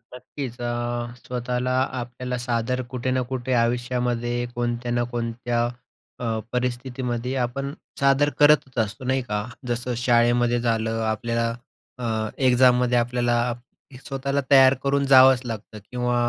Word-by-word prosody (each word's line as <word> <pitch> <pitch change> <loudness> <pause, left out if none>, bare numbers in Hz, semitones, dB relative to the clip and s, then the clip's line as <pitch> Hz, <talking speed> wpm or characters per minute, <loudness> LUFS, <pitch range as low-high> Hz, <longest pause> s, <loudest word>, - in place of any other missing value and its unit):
नक्कीच. 125 -1 -7
अ, 120 0 -1 0.5
स्वतःला 125 0 -2 0.3
आपल्याला 125 +1 -5
सादर 120 +1 -1
कुठे 130 0 -2
ना 130 - +1
कुठे 130 0 -2
आयुष्यामध्ये, 120 0 0
कोणत्या 120 0 -2
ना 120 0 +1
कोणत्या 120 0 -1 0.5
अ, 125 - -4 0.3
परिस्थितीमध्ये, 125 0 -2
आपण 135 +3 -2 0.3
सादर 140 +1 +4
करतच 145 -4 +4
असतो. 110 +5 -8
नाही 130 +1 +1
का. 105 -4 -3 0.2
जसं 120 +1 -2
शाळेमध्ये 120 0 +3
झालं, 115 -1 0
आपल्या 115 +1 -1 0.5
अ, 110 -3 -2 0.2
एक्झाममध्ये 125 -1 +4
आपल्याला 120 0 +1 0.7
स्वतःला 140 +1 -1
तयार 135 -1 +8
करून 140 0 +1
जावंच 130 -1 +7
लागतं 110 -2 -6
किंवा 125 0 0
125 Hz, 120 wpm, -24 LUFS, 120-130 Hz, 0.7 s, तयार